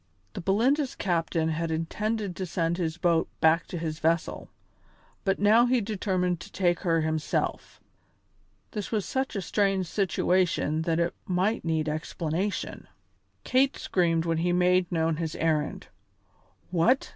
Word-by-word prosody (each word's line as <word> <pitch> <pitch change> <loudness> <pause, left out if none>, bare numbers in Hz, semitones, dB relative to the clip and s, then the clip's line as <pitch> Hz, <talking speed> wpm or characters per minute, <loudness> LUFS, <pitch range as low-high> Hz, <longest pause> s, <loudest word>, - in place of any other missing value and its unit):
The - - -5
Belinda's 250 - +1
captain 165 -3 0
had 165 +1 -2
intended 200 +5 -2
to 185 - -3
send 170 0 -1
his 165 -2 -2
boat 170 -1 +2
back 160 +1 +3
to 175 - -5
his 160 -1 -4
vessel, 165 +1 0 0.7
but 195 -2 +1
now 220 +4 +5
he 250 0 +3
determined 185 -4 -1
to 200 - -11
take 175 -3 +1
her 165 -2 +1
himself. 155 -1 -2 0.9
This 210 -3 -5
was 215 -4 0
such 265 -3 -2
a 195 - -2
strange 195 +1 +1
situation 175 -3 +1
that 165 0 +1
it 170 0 +1
might 190 +5 0
need 160 -1 0
explanation. 160 +5 -3 0.6
Kate 265 +1 +2
screamed 165 -3 +1
when 165 -1 0
he 175 +1 +1
made 180 0 +3
known 165 -2 +1
his 160 -1 -3
errand. 155 -2 -1 0.9
"What!" 205 +10 +2
175 Hz, 145 wpm, -27 LUFS, 165-200 Hz, 0.9 s, now